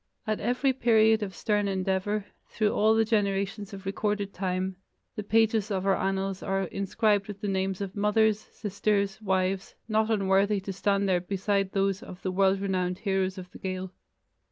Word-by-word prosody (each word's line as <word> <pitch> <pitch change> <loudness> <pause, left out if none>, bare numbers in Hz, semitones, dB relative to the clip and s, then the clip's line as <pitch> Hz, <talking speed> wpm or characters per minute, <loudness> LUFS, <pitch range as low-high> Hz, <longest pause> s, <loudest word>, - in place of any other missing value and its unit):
At 215 -1 -1
every 250 +4 +1
period 220 -3 +4
of 190 -3 -4
stern 205 0 0
endeavor, 195 +2 -1 0.2
through 215 -2 0
all 220 +1 +3
the 225 0 +3
generations 200 -2 0
of 195 -1 -9
recorded 200 0 -1
time, 185 0 -2 0.4
the - - -3
pages 220 0 +2
of 190 -2 -1
our 195 -1 +4
annals 195 0 -1
are 195 0 -1
inscribed 200 +2 0
with 205 -1 -7
the 210 - -3
names 190 0 -1
of 195 -1 -5
mothers, 210 +1 +3
sisters, 200 -1 -2
wives, 190 -1 -1
not 220 0 +1
unworthy 200 -1 +2
to 195 +1 -5
stand 200 +1 +1
there 180 -2 +2
beside 195 +1 -1
those 195 0 +1
of 185 -7 -10
the 185 - -1
world 195 +1 +3
renowned 185 -2 -1
heroes 190 -2 -1
of 180 -1 -9
the - - -12
Gael. 185 -1 -4
195 Hz, 175 wpm, -28 LUFS, 190-210 Hz, 0.4 s, period